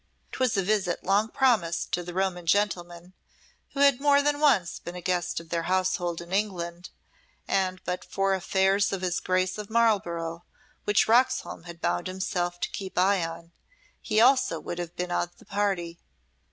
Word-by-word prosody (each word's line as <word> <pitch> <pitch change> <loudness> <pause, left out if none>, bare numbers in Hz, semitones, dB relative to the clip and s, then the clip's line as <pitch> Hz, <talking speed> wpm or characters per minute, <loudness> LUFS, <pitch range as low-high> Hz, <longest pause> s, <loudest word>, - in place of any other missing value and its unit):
'Twas 255 -5 0
a 195 - +2
visit 190 -3 0
long 200 +3 +2
promised 220 -11 +1
to 175 - 0
the 175 0 -7
Roman 180 -1 -2
gentleman 175 -2 -1 0.6
who 275 - -2
had 280 -2 +5
more 285 -1 +5
than 290 0 +1
once 225 - +2
been 175 - -8
a - - -5
guest 175 -1 -1
of 165 -1 -13
their 170 0 -1
household 185 -2 0
in 170 +2 -9
England; 180 -4 -2 0.6
and 185 -1 0
but 180 +1 -3
for 195 0 0
affairs 190 +1 +2
of 190 -2 -3
his 175 -1 0
Grace 185 +2 0
of 210 - -6
Marlborough, 175 -8 0 0.4
which 205 0 +3
Roxholm 250 -5 +2
had 170 -1 -10
bound 90 0 -1
himself 180 -1 -2
to - - -2
keep 190 -1 -7
eye 190 0 +3
on, 165 +1 -7 0.5
he 215 -1 +1
also 255 -8 +4
would 175 - -6
have 175 -1 -5
been 180 0 -3
of 175 0 -2
the - - -18
party. 190 -4 -2
185 Hz, 175 wpm, -27 LUFS, 175-205 Hz, 0.6 s, had